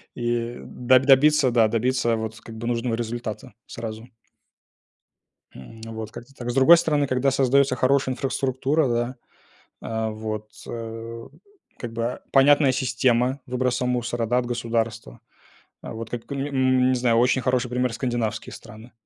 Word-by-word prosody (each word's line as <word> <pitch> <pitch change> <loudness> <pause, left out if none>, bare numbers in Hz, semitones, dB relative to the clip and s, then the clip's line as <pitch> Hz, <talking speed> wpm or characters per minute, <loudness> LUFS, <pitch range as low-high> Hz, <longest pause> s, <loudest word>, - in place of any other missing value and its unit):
и 120 0 -2
до 130 +1 +2
добиться, 135 +1 +5
да, 115 -2 +4
добиться, 120 +1 +1
вот 110 0 -5
как 115 -1 -11
бы, 115 +1 -5
нужного 120 -1 -1
результата 120 0 -5
сразу. 110 0 -7 1.5
Ну 115 +12 -11
вот, 110 -1 -6
как-то 120 +3 -11
так. 120 -2 -6
С - - -6
другой 135 +6 +8
стороны, 150 -3 +1
когда 130 +1 +1
создается 135 0 +3
хорошая 130 +1 +2
инфраструктура, 135 +3 0
да, 120 +1 -1 0.7
а, 110 0 -3
вот, 110 0 -5 0.2
а, 115 0 -7 0.5
как 120 -2 -6
бы, 115 +2 -3
понятная 140 0 +5
система 125 +1 +1
выброса 125 0 -1
мусора, 120 -1 -1
да, 120 +2 +2
от 125 - -1
государства. 115 - -3 0.6
Вот 115 +1 -7
как 120 -1 -7
или, 140 +1 -2
м, 130 -2 +2
не - - +2
знаю 120 -2 +2
очень 125 +2 +3
хороший 125 -1 0
пример 125 0 0
скандинавские 115 -4 -3
страны, 110 +3 -12
120 Hz, 145 wpm, -24 LUFS, 115-130 Hz, 1.5 s, другой